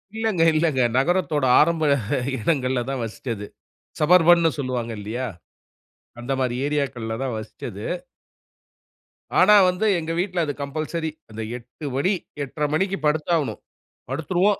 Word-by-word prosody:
இல்லங்க, 220 -6 0
இல்லங்க. 155 -5 +2 0.2
நகரத்தோட 160 -2 +1
ஆரம்ப 160 +1 +3 0.6
இடங்கள்ல 130 -1 +1
தான் 135 -3 -2
வசிச்சது. 110 -2 -5 0.5
சபர்பன்னு 170 0 +5
சொல்லுவாங்க 125 -3 -2
இல்லயா? 120 +5 -3 0.9
அந்தமாரி 130 -1 -1
ஏரியாக்கள்ல 130 -6 -2
தான் 130 -4 -2
வசிச்சது. 110 -1 -7 1.5
ஆனா 210 +3 +7
வந்து 180 +4 -1
எங்க 165 0 -4
வீட்ல 180 -2 0
அது 145 - -2
கம்பல்சரி 155 +3 -3 0.2
அந்த 110 +1 -6 0.2
8:00 125 +5 -11
மணி, 185 +9 +2 0.3
8:30 150 +2 -2
மணிக்கு 195 +4 +1
படுத்தாகணும். 155 0 0 0.5
படுத்துருவோம். 180 +8 +1
150 Hz, 110 wpm, -23 LUFS, 125-170 Hz, 1.5 s, ஆனா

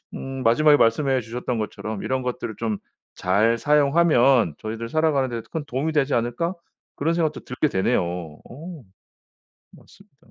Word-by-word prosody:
음 135 -1 -6
마지막에 145 +6 +5
말씀해 130 +1 +2
주셨던 120 +2 -4
것처럼 110 -1 -5
'이런 130 0 -1
것들을 125 -3 -4
좀 110 -3 -2 0.4
잘 105 +6 +2
사용하면 140 - +3
저희들 115 +1 -5
살아가는 150 -3 +1
데 115 -1 -4
큰 160 -2 -4
도움이 145 +5 -2
되지 145 -2 +1
않을까?' 120 +9 -1 0.4
그런 160 +4 +1
생각도 165 -2 0
들게 130 +4 -1
되네요. 95 +1 +1
어. 90 - -8 0.9
맞습니다. - - -20
125 Hz, 330 characters per minute, -23 LUFS, 115-150 Hz, 0.9 s, 마지막에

